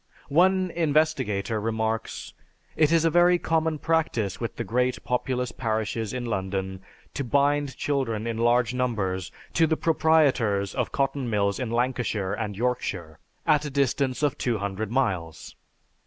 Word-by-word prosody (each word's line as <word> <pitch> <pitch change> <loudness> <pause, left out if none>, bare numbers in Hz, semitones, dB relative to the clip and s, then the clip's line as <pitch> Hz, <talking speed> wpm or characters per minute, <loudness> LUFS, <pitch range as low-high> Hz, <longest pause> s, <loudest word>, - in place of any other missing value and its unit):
One 185 +4 +3
investigator 140 - +1
remarks: 110 0 -2 0.4
"It 155 -1 +3
is 165 -1 +3
a 165 - +3
very 175 +2 +5
common 160 -2 0
practice 120 - 0
with 115 -2 -4
the - - -3
great 125 +4 0
populous 125 0 -1
parishes 110 -1 -2
in 125 -1 -4
London 95 -3 -3 0.3
to 140 - -3
bind 140 +2 +1
children 120 -7 -1
in 115 -1 -3
large 120 +1 +3
numbers 105 -8 -1 0.2
to 165 -1 +4
the 160 0 +1
proprietors 135 -12 +2
of 125 -3 -2
cotton 135 -2 -1
mills 100 -1 0
in 125 -3 -2
Lancashire 115 -5 -1
and 105 -2 -4
Yorkshire, 100 -9 -2 0.3
at 150 -1 +3
a - - -3
distance 135 0 0
of 145 - +1
200 105 -3 -2
miles. 90 - -2
125 Hz, 140 wpm, -26 LUFS, 105-145 Hz, 0.4 s, very